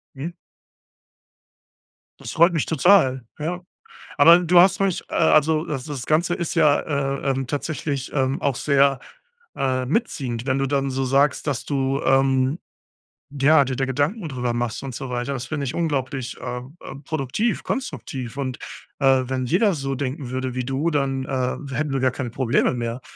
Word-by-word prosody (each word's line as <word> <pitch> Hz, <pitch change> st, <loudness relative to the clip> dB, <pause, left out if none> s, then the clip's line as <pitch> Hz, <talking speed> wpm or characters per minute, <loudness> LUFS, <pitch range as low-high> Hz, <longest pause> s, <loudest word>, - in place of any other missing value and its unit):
Mhm. 145 Hz, +6 st, -5 dB, 1.9 s
Das -, -, -7 dB
freut 170 Hz, +2 st, +4 dB
mich 160 Hz, -, 0 dB
total, 155 Hz, -6 st, +4 dB, 0.2 s
ja. 175 Hz, +4 st, -3 dB, 0.6 s
Aber 170 Hz, +1 st, +8 dB
du 175 Hz, 0 st, +4 dB
hast 190 Hz, +1 st, +5 dB
mich, 195 Hz, -3 st, 0 dB
äh -, -, -9 dB
also 155 Hz, +1 st, +3 dB
das 135 Hz, -6 st, -4 dB
das 140 Hz, -5 st, -5 dB
Ganze 170 Hz, +3 st, +2 dB
ist 170 Hz, -1 st, -3 dB
ja, 150 Hz, -3 st, +4 dB
äh, 140 Hz, -1 st, -2 dB
ähm, 135 Hz, -1 st, -3 dB
tatsächlich, 145 Hz, -1 st, -3 dB
ähm, 135 Hz, 0 st, 0 dB
auch 140 Hz, -2 st, 0 dB
sehr, 140 Hz, 0 st, +3 dB, 0.6 s
äh, 130 Hz, -1 st, 0 dB
mitziehend, 130 Hz, -, -2 dB
wenn 135 Hz, 0 st, 0 dB
du 135 Hz, -, +1 dB
dann 140 Hz, 0 st, 0 dB
so 135 Hz, 0 st, -1 dB
sagst, 140 Hz, +4 st, +2 dB
dass 140 Hz, -4 st, -2 dB
du, 135 Hz, -1 st, -1 dB
ähm, 135 Hz, +2 st, +2 dB, 0.7 s
ja, 145 Hz, +2 st, +5 dB
dir 130 Hz, 0 st, -3 dB
da 135 Hz, -, 0 dB
Gedanken 145 Hz, -, -1 dB
drüber 125 Hz, -3 st, -2 dB
machst 120 Hz, +1 st, -3 dB
und 135 Hz, -2 st, -6 dB
so 130 Hz, -, -6 dB
weiter. 120 Hz, +2 st, -3 dB
Das 130 Hz, -2 st, -4 dB
finde 145 Hz, 0 st, -3 dB
ich 125 Hz, -, -3 dB
unglaublich, 135 Hz, -6 st, -2 dB
ähm 125 Hz, +4 st, -6 dB
ähm, 140 Hz, +2 st, -9 dB
produktiv, 155 Hz, -, -2 dB
konstruktiv 135 Hz, -, -5 dB
und, 130 Hz, -3 st, -3 dB, 0.4 s
äh, 135 Hz, -2 st, +4 dB
wenn 130 Hz, 0 st, -2 dB
jeder 195 Hz, -, +2 dB
so 135 Hz, -3 st, -3 dB
denken 135 Hz, 0 st, -4 dB
würde 130 Hz, 0 st, -3 dB
wie 125 Hz, -1 st, -2 dB
du, 135 Hz, +5 st, 0 dB
dann, 135 Hz, -3 st, 0 dB
äh, 130 Hz, -2 st, -1 dB, 0.2 s
hätten 150 Hz, 0 st, -1 dB
wir 135 Hz, -, 0 dB
gar 130 Hz, -1 st, +3 dB
keine 125 Hz, 0 st, -4 dB
Probleme 120 Hz, +1 st, +1 dB
mehr. 120 Hz, 0 st, -4 dB
135 Hz, 175 wpm, -22 LUFS, 130-155 Hz, 1.9 s, Aber